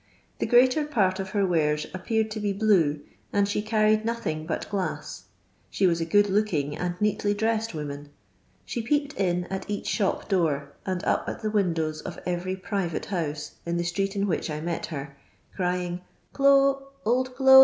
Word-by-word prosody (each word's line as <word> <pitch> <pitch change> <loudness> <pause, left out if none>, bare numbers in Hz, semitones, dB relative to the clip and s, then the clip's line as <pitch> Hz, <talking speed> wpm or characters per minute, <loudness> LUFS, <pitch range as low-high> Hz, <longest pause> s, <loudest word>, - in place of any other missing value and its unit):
The - - 0
greater 255 +4 +5
part 200 -10 +1
of 190 0 -3
her 200 0 +1
wares 150 -4 +1
appeared 220 +4 -1
to 215 - -3
be 205 -1 0
blue, 185 -8 +3 0.3
and 200 0 +2
she 205 +1 0
carried 215 0 +3
nothing 160 -9 -2
but - - -2
glass. 195 -3 -4 0.4
She 195 - +1
was 170 -2 +3
a - - 0
good 205 +5 +4
looking 185 -8 0
and 180 0 -3
neatly 205 0 +1
dressed 220 -1 0
woman. 145 -1 -5 0.6
She 235 - -3
peeped 285 +5 0
in 180 -2 0
at 190 +2 -4
each 205 - -3
shop 200 -4 0
door, 160 -8 0
and 185 -2 -1
up - - +1
at - - -6
the 215 - 0
windows 165 -6 0
of - - -7
every 180 +1 -1
private 190 -3 -2
house, 155 -6 -3
in 170 0 -1
the 170 - 0
street 195 +4 -1
in 200 0 +1
which 175 -3 -1
I 150 0 -3
met 170 +1 -3
her, 140 -3 -6 0.4
crying, 180 -1 -1 0.2
" - - -39
Clo', 275 0 +4 0.2
old 255 +2 +1
do' 265 0 +9
195 Hz, 185 wpm, -26 LUFS, 170-215 Hz, 0.6 s, do